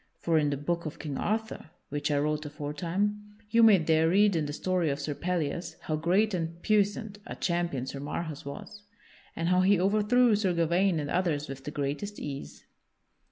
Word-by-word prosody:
For 165 -2 +2
in 150 -1 +1
the 140 - -1
Book 170 +3 -2
of 155 - -7
King 145 -4 -5
Arthur 220 -5 -2 0.2
(which 145 +1 -2
I 145 - +2
wrote 150 +1 0
aforetime) 175 +8 -3
you 230 - +5
may 220 -3 +8
there 160 -1 +3
read 200 +2 +4
in 155 -2 0
the - - -4
story 180 +1 0
of 140 0 -2
Sir 145 +1 -3
Pellias 170 0 -2
how 155 - -2
great 185 +7 +2
and 165 -1 -3
puissant 205 0 +1
a - - -6
champion 170 -7 -1
Sir 135 +1 -6
Marhaus 150 +1 -4
was, 140 +8 -8 0.5
and 165 +1 -1
how 180 0 +4
he 190 0 +4
overthrew 215 +5 +4
Sir 200 -3 +1
Gawaine 170 +1 +2
and 145 -1 -4
others 165 -5 0
with 135 -1 -8
the - - -3
greatest 145 +8 -3
ease. 140 -1 -7
170 Hz, 190 wpm, -29 LUFS, 150-200 Hz, 0.5 s, may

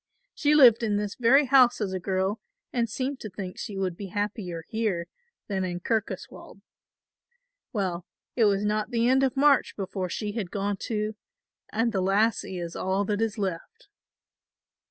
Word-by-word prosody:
She 300 0 +2
lived 245 -6 +7
in 215 -3 0
this 205 -1 -2
very 265 +4 +4
house 255 -2 +5
as 200 -4 -2
a 185 - -2
girl 190 +3 -1 0.3
and 235 -2 0
seemed 265 +4 -3
to 215 - -6
think 185 -1 -7
she 200 - -5
would 185 -3 -1
be 200 +2 -7
happier 195 -4 -3
here 215 -7 -1 0.4
than 195 -2 -1
in 175 -1 -3
Kirkoswald. 220 +3 -4 1.1
Well, 185 -5 -2 0.3
it 230 - +4
was 200 0 +2
not 210 +1 0
the 235 -1 +1
end 260 +1 +4
of 265 -1 +1
March 285 0 +4
before 190 -2 -4
she 210 +3 -3
had 205 -4 -4
gone 200 +1 -2
too 215 +1 -2 0.6
and 230 +2 +1
the 195 -3 0
lassie 195 0 +1
is 170 -1 -5
all 190 +2 0
that 210 +1 -1
is 225 0 -1
left." 200 - -5
210 Hz, 170 wpm, -27 LUFS, 190-230 Hz, 1.1 s, lived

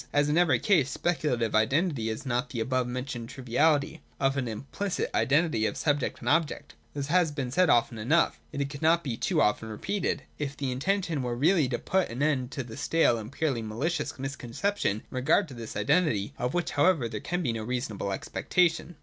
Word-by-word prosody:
As 145 0 +2
in 150 - +2
every 160 -8 +4
case, 150 - +3
speculative 145 -8 0
identity 125 +2 +1
is 110 +6 -5
not 125 +2 -1
the 125 -6 -4
above 130 +2 0
mentioned 125 -1 -5
triviality 145 +5 +1 0.2
of 135 0 +2
an 130 -3 -1
implicit 140 - -3
identity 140 -6 +2
of - - -4
subject 145 -3 0
and 120 - -7
object. 160 +1 0 0.2
This 140 -1 -2
has 165 +1 +2
been 135 -4 -4
said 180 +5 +3
often 120 -2 +3
enough. 150 +10 +2
Yet 140 - -1
it 140 - -5
could 140 - -8
not 165 +2 +3
be 125 -5 -2
too - - +1
often 110 +1 0
repeated, 195 - -2 0.2
if 145 -1 -3
the 135 -2 -2
intention 170 +3 -1
were 120 -1 -2
really 155 +1 +3
to 120 - -1
put 190 +7 0
an 125 +5 -2
end 135 -5 +1
to 130 - -3
the 115 -2 -10
stale 160 -8 +2
and 110 +2 -8
purely 140 -6 -1
malicious 140 +11 -2
misconception 135 - -2
in - - -26
regard 130 +9 +2
to - - -9
this 115 -2 -8
identity: 105 - +1
— - - -31
of 125 +4 -1
which 175 -1 0
however 145 -3 +3
there 110 -2 -5
can 175 +8 -2
be 120 -6 0
no 115 - -4
reasonable 115 -4 -3
expectation. 175 - 0
135 Hz, 205 wpm, -28 LUFS, 120-160 Hz, 0.2 s, every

